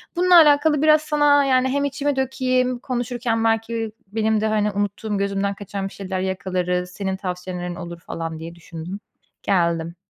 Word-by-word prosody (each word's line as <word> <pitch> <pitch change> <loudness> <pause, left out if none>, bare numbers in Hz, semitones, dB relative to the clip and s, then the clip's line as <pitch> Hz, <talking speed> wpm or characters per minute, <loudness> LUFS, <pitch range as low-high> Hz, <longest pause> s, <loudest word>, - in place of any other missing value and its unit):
Bununla 360 0 +4
alakalı 295 -1 +5
biraz 310 0 +5
sana, 295 -2 +3
yani, 260 -1 +3
hem 285 +2 0
içimi 285 0 -1
dökeyim, 255 -1 0
konuşurken 240 -2 -2
belki 225 0 0 0.2
benim 220 +1 0
de, 220 - +1
hani, 210 -1 +1
unuttuğum, 205 +1 -2
gözümden 200 0 -1
kaçan 200 -1 -5
bir - - -11
şeyler 190 -1 -4
yakalarız, 180 -1 -2
senin 190 0 -3
tavsiyelerin 180 -1 -5
olur 170 -1 -8
falan 165 -1 -6
diye 165 +1 -8
düşündüm. 170 +3 -8 0.4
Geldim. 170 -3 0
210 Hz, 155 wpm, -22 LUFS, 185-260 Hz, 0.4 s, alakalı